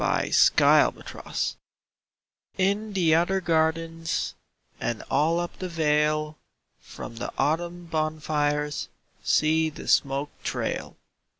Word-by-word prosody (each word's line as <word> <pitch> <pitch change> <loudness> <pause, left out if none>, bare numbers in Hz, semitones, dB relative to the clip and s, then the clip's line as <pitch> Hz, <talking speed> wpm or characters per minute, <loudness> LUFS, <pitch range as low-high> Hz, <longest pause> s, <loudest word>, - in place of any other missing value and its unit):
VI - - 0 0.3
Autumn - - +4
Fires - - -4 1.0
In 200 +3 0
the 170 -5 +3
other 175 +4 +2
gardens 165 -1 0 0.5
And 120 - -3
all 165 +3 +2
up 175 0 -5
the 185 - -4
vale, 155 -1 +1 0.4
From 115 - -10
the - - -4
autumn 175 +3 -1
bonfires 150 -2 -1 0.3
See 160 +1 +2
the 155 - -10
smoke 140 +1 +2
trail! - - -3
160 Hz, 105 wpm, -26 LUFS, 150-170 Hz, 1.0 s, Autumn